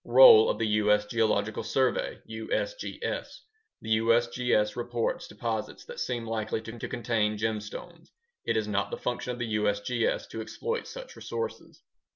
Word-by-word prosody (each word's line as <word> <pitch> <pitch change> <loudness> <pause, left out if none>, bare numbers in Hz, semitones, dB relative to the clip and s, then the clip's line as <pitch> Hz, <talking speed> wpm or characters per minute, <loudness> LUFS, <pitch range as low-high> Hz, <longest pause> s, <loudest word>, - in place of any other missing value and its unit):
Role 460 -3 +9
of - - 0
the 115 - 0
U.S. 105 -1 +3
Geological 110 -1 +1
Survey 125 +3 0
(USGS) 110 - -3 0.4
The 110 0 +2
USGS 115 -1 +2
reports 120 -1 -2
deposits 110 0 -4
that - - -8
seem 120 -2 -2
likely 110 -1 -2
to 115 +1 -7
contain 110 -3 0
gemstones. 110 +11 -4 0.3
It - - 0
is 110 -1 0
not 100 -1 -1
a - - -3
function 125 0 -2
of - - -7
the 115 -3 -1
USGS 105 +3 0
to 110 - -5
exploit 465 - -3
such - - -9
resources. 460 +1 -6
115 Hz, 145 wpm, -28 LUFS, 105-125 Hz, 0.4 s, Role